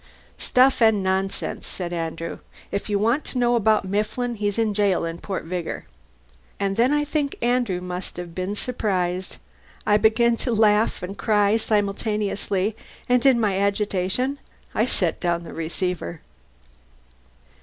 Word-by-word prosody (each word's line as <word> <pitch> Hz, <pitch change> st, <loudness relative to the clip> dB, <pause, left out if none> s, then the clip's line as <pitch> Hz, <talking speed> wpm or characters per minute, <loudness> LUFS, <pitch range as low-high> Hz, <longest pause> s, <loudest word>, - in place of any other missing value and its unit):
"Stuff 255 Hz, 0 st, +3 dB
and 220 Hz, -3 st, +5 dB
nonsense," 190 Hz, +1 st, -2 dB
said 175 Hz, -2 st, -4 dB
Andrew. 165 Hz, 0 st, -4 dB, 0.3 s
"If 200 Hz, -, -3 dB
you 205 Hz, -, +2 dB
want 235 Hz, +8 st, +2 dB
to -, -, -5 dB
know 240 Hz, -1 st, +3 dB
about 220 Hz, -3 st, +3 dB
Mifflin, 215 Hz, +5 st, -1 dB
he's 205 Hz, -2 st, -2 dB
in 220 Hz, -2 st, +1 dB
jail 200 Hz, -4 st, +2 dB
in 165 Hz, +1 st, -5 dB
Port 190 Hz, 0 st, -4 dB
Vigor." 175 Hz, 0 st, -4 dB, 0.7 s
And 195 Hz, -1 st, 0 dB
then 240 Hz, +5 st, +3 dB
I 295 Hz, 0 st, +2 dB
think 290 Hz, -1 st, -1 dB
Andrew 240 Hz, -7 st, +1 dB
must 180 Hz, 0 st, -6 dB
have 175 Hz, -1 st, -6 dB
been 185 Hz, +3 st, -3 dB
surprised. 190 Hz, -6 st, -2 dB, 0.5 s
I 210 Hz, -, +5 dB
began 230 Hz, +2 st, +3 dB
to 245 Hz, -, -1 dB
laugh 215 Hz, -2 st, +3 dB
and 190 Hz, +2 st, -5 dB
cry 210 Hz, -1 st, +3 dB
simultaneously, 210 Hz, -1 st, 0 dB, 0.3 s
and 245 Hz, -1 st, +3 dB
in 255 Hz, -3 st, +5 dB
my 200 Hz, -4 st, +1 dB
agitation 200 Hz, +6 st, 0 dB, 0.3 s
I -, -, +2 dB
set -, -, 0 dB
down 170 Hz, -1 st, 0 dB
the -, -, -9 dB
receiver. 170 Hz, 0 st, -3 dB
205 Hz, 145 wpm, -24 LUFS, 185-230 Hz, 0.7 s, and